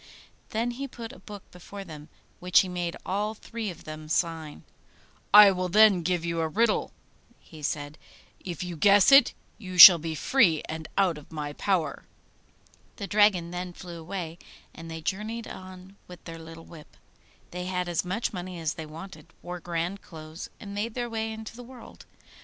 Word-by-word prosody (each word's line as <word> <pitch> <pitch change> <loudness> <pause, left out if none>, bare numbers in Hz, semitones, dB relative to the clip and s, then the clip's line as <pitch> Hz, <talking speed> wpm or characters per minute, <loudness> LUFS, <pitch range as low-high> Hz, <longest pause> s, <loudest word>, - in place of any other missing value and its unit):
Then 230 +2 -1
he 275 +3 -6
put 235 -1 -9
a - - -14
book 205 -2 -11
before 195 +3 -10
them, 155 -3 -11 0.3
which 180 0 +4
he 190 - -4
made 175 -2 -4
all 210 +3 -2
three 225 0 -6
of 175 -2 -10
them 155 0 -9
sign. 160 -2 -2 0.7
'I 205 -1 +10
will 185 -1 -2
then 210 -1 +6
give 175 0 -1
you 170 0 -2
a 160 - 0
riddle,' 215 +6 +1 0.5
he 155 -2 -15
said; 145 +1 -4 0.4
'if 175 -2 -5
you 175 -1 -6
guess 200 - +5
it, 275 -2 +7 0.2
you 185 -4 -8
shall 175 0 +12
be 160 0 -4
free 170 - +2
and 160 0 -6
out 180 -6 +2
of 150 - -19
my 150 -2 -5
power.' 165 -5 -1 0.9
The 200 - -6
dragon 200 -4 +3
then 180 0 -5
flew 175 -2 -9
away, 170 0 -6 0.3
and 165 0 -10
they 160 0 -7
journeyed 215 +7 -4
on 185 +1 -11
with 180 -1 -13
their 165 -1 -9
little 165 0 -11
whip. 155 -3 -15 0.5
They 180 0 -5
had 180 -1 -2
as 175 -2 -1
much 195 +7 -3
money 180 -1 -6
as 160 -1 -2
they 160 -1 -8
wanted, 165 +4 -11 0.2
wore 180 0 -6
grand 175 +3 -3
clothes, 160 0 -10
and 200 -1 -9
made 215 +2 -3
their 240 -2 -3
way 225 0 -3
into 220 0 -8
the 245 - -10
world. 250 +1 -14
180 Hz, 180 wpm, -27 LUFS, 165-205 Hz, 0.9 s, shall